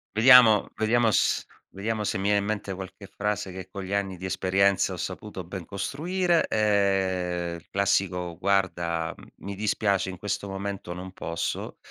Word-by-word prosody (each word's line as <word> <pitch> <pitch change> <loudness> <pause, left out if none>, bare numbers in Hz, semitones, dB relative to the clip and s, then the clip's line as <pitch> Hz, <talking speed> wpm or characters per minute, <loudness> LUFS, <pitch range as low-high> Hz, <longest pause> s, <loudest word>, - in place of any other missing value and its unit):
Vediamo 115 -2 +7
vediamo 115 +2 +2
s - - +2 0.2
vediamo 105 +2 -3
se 105 - -1
mi 95 - -3
viene 100 0 +3
in - - -2
mente 105 -2 -3
qualche 95 +1 -9
frase 100 -2 -3
che 95 0 -8
con 100 0 -6
gli 95 +2 -5
anni 95 -2 -1
di 95 - -7
esperienza 95 +1 +2
ho - - -5
saputo 95 -4 -6
ben 95 0 -6
costruire, 170 - 0
ehm, 95 -5 +1
il 85 - -13
classico: 95 -3 0
"Guarda, 85 -4 0 0.2
mi 100 0 -7
dispiace 100 -2 0
in 90 - -7
questo 100 0 -3
momento 95 -2 -5
non 90 +1 -8
posso, 85 -2 -4
100 Hz, 160 wpm, -26 LUFS, 95-105 Hz, 0.2 s, Vediamo